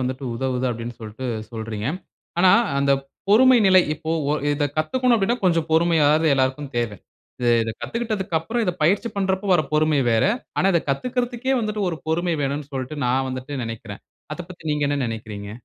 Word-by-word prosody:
வந்துட்டு 130 Hz, +1 st, -3 dB
உதவுது 130 Hz, +1 st, -1 dB
அப்டினு 115 Hz, 0 st, -6 dB
சொல்லிட்டு 110 Hz, +4 st, -7 dB, 0.3 s
சொல்றீங்க. 110 Hz, -1 st, -4 dB, 0.5 s
ஆனா 185 Hz, +1 st, +6 dB, 0.3 s
அந்த 140 Hz, 0 st, +3 dB, 0.4 s
பொறுமை 250 Hz, +4 st, +6 dB
நிலை 185 Hz, -1 st, +7 dB
இப்போ 160 Hz, +1 st, -6 dB, 0.2 s
ஓ -, -, +3 dB, 0.2 s
இத 145 Hz, 0 st, 0 dB
கத்துக்கனும் 245 Hz, +11 st, +2 dB
அப்டின்னா, 225 Hz, +4 st, +1 dB
கொஞ்சம் 165 Hz, -3 st, +2 dB
பொறுமையாவது 160 Hz, -1 st, +4 dB
எல்லாருக்கும் 135 Hz, +1 st, -1 dB
தேவ. 120 Hz, -2 st, 0 dB, 0.7 s
இத 110 Hz, -, -3 dB
கத்துக்கிட்டதுக்கு 215 Hz, -7 st, -2 dB
அப்புறம், 225 Hz, +9 st, -2 dB
இத 180 Hz, -, 0 dB
பயிற்சி 200 Hz, +8 st, +2 dB
பண்றப்போ 190 Hz, +1 st, 0 dB
வர 155 Hz, -, +3 dB
பொறுமை 150 Hz, -1 st, +3 dB
வேற. 110 Hz, -1 st, +3 dB, 0.3 s
ஆனா 190 Hz, -, +3 dB
இத 170 Hz, -, +4 dB
கத்துக்றதுக்கே 250 Hz, -, -1 dB
வந்துட்டு, 210 Hz, -1 st, -2 dB
ஒரு 160 Hz, -, -5 dB
பொறுமை 170 Hz, +1 st, 0 dB
வேணும்னு 140 Hz, +1 st, -3 dB
சொல்லிட்டு 130 Hz, +3 st, -4 dB
நான் 130 Hz, +2 st, +1 dB
வந்துட்டு 130 Hz, +1 st, -5 dB
நெனைக்கிறேன். 115 Hz, -2 st, -7 dB, 0.3 s
அதபத்தி 175 Hz, -1 st, -10 dB
நீங்க 150 Hz, -1 st, 0 dB
என்ன 145 Hz, -, 0 dB
நெனைக்றீங்க? 105 Hz, -3 st, -6 dB
155 Hz, 160 wpm, -22 LUFS, 130-190 Hz, 0.7 s, நிலை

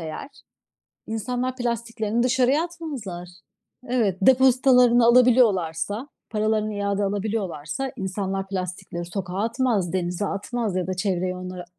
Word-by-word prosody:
eğer 160 Hz, -, -6 dB, 0.8 s
insanlar 245 Hz, +3 st, -2 dB
plastiklerini 235 Hz, -2 st, -1 dB
dışarıya 260 Hz, +4 st, +3 dB
atmazlar. 270 Hz, -, -6 dB, 0.6 s
Evet, 220 Hz, -7 st, +1 dB
depozitalarını 250 Hz, -1 st, +5 dB
alabiliyorlarsa, 230 Hz, -, +3 dB, 0.2 s
paralarını 215 Hz, -1 st, 0 dB
iade 200 Hz, 0 st, -1 dB
alabiliyorlarsa 200 Hz, -, -2 dB
insanlar 195 Hz, 0 st, -3 dB
plastikleri 185 Hz, -2 st, -5 dB
sokağa 185 Hz, +1 st, -4 dB
atmaz, 230 Hz, -7 st, 0 dB
denize 180 Hz, +2 st, -1 dB
atmaz 205 Hz, +1 st, -3 dB
ya 185 Hz, -1 st, -1 dB
da 185 Hz, -, -1 dB
çevreyi 185 Hz, -1 st, -1 dB
onlar 180 Hz, -1 st, -7 dB
210 Hz, 105 wpm, -24 LUFS, 185-245 Hz, 0.8 s, depozitalarını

